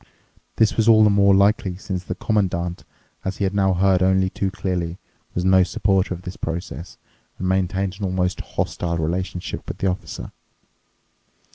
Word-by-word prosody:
This 110 -1 +2
was 110 -1 +2
all 110 -1 +7
the 105 - +5
more 100 -1 +5
likely 100 -2 +2
since 95 -2 -4
the - - -4
Commandant, 90 -5 -1 0.4
as 95 0 -3
he - - -2
had 95 0 0
now 95 -2 +2
heard 95 0 +3
only 95 0 +3
too 100 - -1
clearly, 90 -3 -3 0.4
was 90 - -1
no 95 0 +6
supporter 95 +1 +1
of 90 - -12
this 90 - -7
process 80 -1 -5 0.4
and 95 - -3
maintained 95 0 0
an 100 - -2
almost 90 0 -1
hostile 85 -1 -2
relationship 90 +3 -3
with - - -5
the - - -3
Officer. 90 - -7
95 Hz, 165 wpm, -22 LUFS, 90-100 Hz, 0.4 s, all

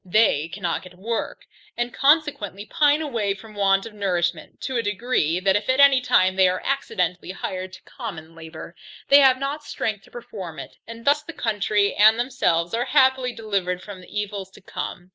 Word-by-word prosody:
They 180 -6 +2
cannot 170 +1 -3
get 180 -1 -14
work, 230 - -4 0.3
and 240 0 -2
consequently 275 - +1
pine 300 +1 +2
away 220 -9 -1
from 215 +1 -13
want 195 -1 +2
of 225 - -9
nourishment, 175 -5 -2
to 260 -2 -2
a - - +1
degree, 205 -6 0
that 190 0 +2
if 205 - -1
at 260 +1 +2
any 280 -2 +7
time 185 -6 +3
they 190 -1 +5
are 185 - -1
accidentally 180 -12 -2
hired 185 0 -5
to 185 - -13
common 160 0 -8
labour, 165 +1 -10 0.3
they 280 - +8
have 265 -2 +5
not 280 +3 -4
strength 210 -2 -3
to - - -19
perform 205 -9 -8
it, - - -9
and 230 0 -10
thus 290 +1 +3
the 340 +3 -9
country 210 -4 0
and 215 +2 +6
themselves 180 -9 0
are 235 +2 0
happily 265 -2 +3
delivered 195 -6 -2
from 200 -3 -9
the 180 - -15
evils 205 -2 -4
to - - -15
come. 180 -1 -7
210 Hz, 190 wpm, -23 LUFS, 185-255 Hz, 0.3 s, they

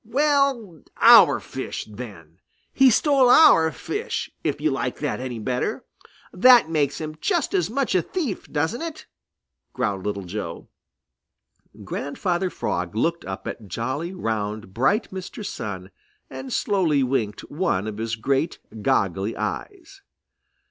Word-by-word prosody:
"Well, 265 - +1 0.2
our - - +8
fish, - - -6
then! 100 -7 -10 0.3
He 270 -1 +6
stole 265 +1 +4
our 165 - +7
fish, - - -4
if - - -1
you - - +1
like - - -2
that - - -2
any 125 -2 -5
better. 125 +3 -2 0.5
That 240 -3 +6
makes 145 -3 0
him 155 -1 -6
just 345 -7 0
as 180 -2 +1
much 260 0 -1
a 185 - +3
thief, 285 - -4
doesn't 160 - -1
it?" 330 -2 -6 0.7
growled 105 -7 -2
Little 100 -1 -3
Joe. 90 -2 -6 1.1
Grandfather 175 +5 -2
Frog 90 - -3
looked 165 +9 0
up 95 0 -6
at 110 - -7
jolly, 130 - -3
round, 110 - -4
bright 135 - +1
Mr. 190 +3 -7
Sun 95 - -6 0.4
and 130 0 -7
slowly 165 -9 +1
winked 115 -6 -1
one 145 - 0
of 110 -1 -5
his 115 0 -2
great, 135 +7 -1 0.2
goggly 100 +2 0
eyes. 390 -1 -6
145 Hz, 135 wpm, -23 LUFS, -, 1.1 s, our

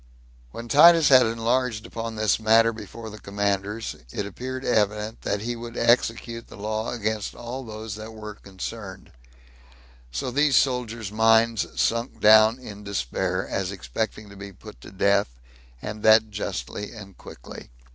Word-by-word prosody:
When 115 - -8
Titus 165 +4 +7
had 130 -3 +7
enlarged 115 0 -1
upon 115 -1 -6
this 110 0 +1
matter 115 +1 +4
before 110 +1 -9
the 105 - -10
commanders, 100 +2 -2 0.2
it 100 - -3
appeared 130 +6 -6
evident 105 0 0
that 100 0 -2
he 120 +2 -3
would 120 0 -8
execute 115 0 +1
the - - -13
law 110 +2 -3
against 110 -3 -3
all 125 +3 -6
those 110 -2 -7
that 110 +1 -8
were 105 -1 -8
concerned; 100 0 -8 1.0
so 65 - -3
these 145 +1 +3
soldiers' 120 -6 0
minds 115 0 +2
sunk 115 +2 0
down 110 +2 +6
in 105 -5 -10
despair, 95 +1 -2
as 95 -1 -2
expecting 100 - -4
to - - -12
be 100 0 -9
put 105 +3 -14
to - - -11
death, 100 -9 +1 0.5
and 105 0 -6
that 110 0 +5
justly 100 +1 -5
and 100 -4 -11
quickly. - - -11
110 Hz, 150 wpm, -24 LUFS, 100-115 Hz, 1.0 s, Titus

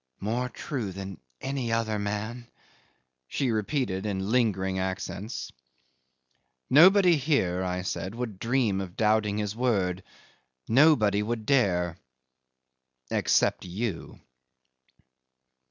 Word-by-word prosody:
"More 120 +5 -2
true 120 -4 -4
than 95 -3 -7 0.2
any 135 -3 -2
other 110 -2 0
man," 110 +4 -4 0.8
she 130 - -1
repeated 110 -3 -1
in 95 0 -2
lingering 95 -6 +1
accents. 95 +4 -4 1.2
"Nobody 180 +4 +7
here," 110 - +1
I 90 0 -2
said, 95 +2 -4
"would 115 -6 -5
dream 115 -5 +1
of 90 -2 -7
doubting 105 -1 +2
his 105 0 -2
word 100 -7 0 0.7
nobody 115 -6 +4
would 110 0 -3
dare 90 -10 +1 1.1
except - - +2
you." 95 +1 -5
105 Hz, 100 wpm, -27 LUFS, 95-125 Hz, 1.2 s, Nobody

